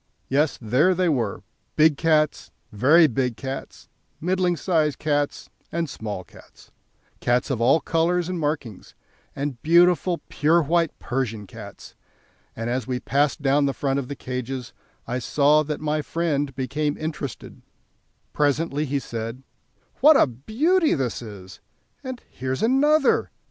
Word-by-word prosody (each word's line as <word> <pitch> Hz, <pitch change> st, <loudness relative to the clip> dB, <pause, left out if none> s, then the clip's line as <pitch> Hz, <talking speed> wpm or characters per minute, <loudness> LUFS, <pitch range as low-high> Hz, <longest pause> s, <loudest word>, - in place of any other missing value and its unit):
Yes, 145 Hz, +2 st, +1 dB
there 130 Hz, -, +2 dB
they 180 Hz, -1 st, +2 dB
were, 120 Hz, -9 st, -1 dB, 0.3 s
big 155 Hz, -1 st, +5 dB
cats, 155 Hz, -1 st, +1 dB, 0.2 s
very 145 Hz, +11 st, +5 dB
big 125 Hz, -3 st, -1 dB
cats, 135 Hz, 0 st, -7 dB, 0.3 s
middling 180 Hz, 0 st, 0 dB
sized 155 Hz, -3 st, +1 dB
cats, 145 Hz, -1 st, -1 dB, 0.2 s
and 170 Hz, 0 st, -1 dB
small 105 Hz, -7 st, -6 dB
cats, -, -, -18 dB, 0.5 s
cats 125 Hz, +3 st, +1 dB
of 120 Hz, -4 st, -2 dB
all 130 Hz, +7 st, +5 dB
colours 165 Hz, +3 st, 0 dB
and 180 Hz, -1 st, -3 dB
markings, 145 Hz, -, -4 dB, 0.4 s
and 135 Hz, -4 st, -4 dB
beautiful 175 Hz, +1 st, +4 dB
pure 165 Hz, +3 st, +2 dB
white 165 Hz, +1 st, +1 dB
Persian 115 Hz, -4 st, -3 dB
cats; 100 Hz, -1 st, -11 dB, 0.6 s
and 115 Hz, +1 st, -4 dB
as 125 Hz, +2 st, -2 dB
we 125 Hz, -1 st, -2 dB
passed 140 Hz, +2 st, 0 dB
down 140 Hz, +1 st, +3 dB
the 135 Hz, -, -2 dB
front 135 Hz, -1 st, 0 dB
of 130 Hz, -, -5 dB
the 140 Hz, -, -5 dB
cages 125 Hz, -1 st, -5 dB, 0.3 s
I 125 Hz, +1 st, -2 dB
saw 150 Hz, +4 st, +3 dB
that 150 Hz, 0 st, -4 dB
my 155 Hz, 0 st, -1 dB
friend 145 Hz, -4 st, -2 dB
became 145 Hz, +3 st, -2 dB
interested; 150 Hz, -7 st, -6 dB, 0.7 s
presently 150 Hz, +1 st, 0 dB
he 140 Hz, 0 st, -1 dB
said: 115 Hz, 0 st, -5 dB, 0.6 s
"What 300 Hz, +1 st, +7 dB
a -, -, +6 dB
beauty 270 Hz, -, +1 dB
this 130 Hz, -4 st, -2 dB
is! 95 Hz, -4 st, -10 dB, 0.4 s
and 260 Hz, -2 st, -7 dB
here's 130 Hz, -, -3 dB
another!" 290 Hz, +6 st, +3 dB
145 Hz, 140 wpm, -24 LUFS, 125-165 Hz, 0.7 s, What